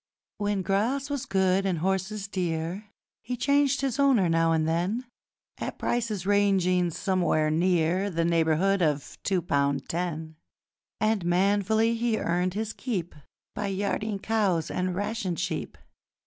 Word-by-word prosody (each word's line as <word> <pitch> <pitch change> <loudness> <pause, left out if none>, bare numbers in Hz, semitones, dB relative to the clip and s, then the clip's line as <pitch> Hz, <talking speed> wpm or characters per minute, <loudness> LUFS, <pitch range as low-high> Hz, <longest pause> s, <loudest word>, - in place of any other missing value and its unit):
When 205 -2 0
grass 240 +9 0
was 285 -3 -3
good, 190 0 +2
and 190 -3 0
horses 190 +4 -1
dear, 180 +1 -3 0.3
He 250 +1 -4
changed 280 +2 +2
his 270 -1 -1
owner 265 -10 +4
now 165 0 +3
and 160 -1 +1
then 180 +10 -1 0.5
At - - -4
prices 220 -6 -1
ranging 190 -3 +3
somewhere 175 -4 +1
near 175 +3 +2
The 165 -2 0
neighbourhood 170 +4 +2
of 150 -3 -1
two 185 -3 0
pound 140 -3 0
ten: 160 -2 -4 0.6
And 215 -3 +1
manfully 200 +5 +2
he 230 -1 0
earned 180 +1 0
his 220 0 -2
keep 190 -10 -3 0.4
By 205 -1 -3
yarding 200 +2 -1
cows 195 -6 0
and 185 0 -1
ration 200 -2 -2
sheep. - - -3
190 Hz, 135 wpm, -27 LUFS, 170-215 Hz, 0.6 s, owner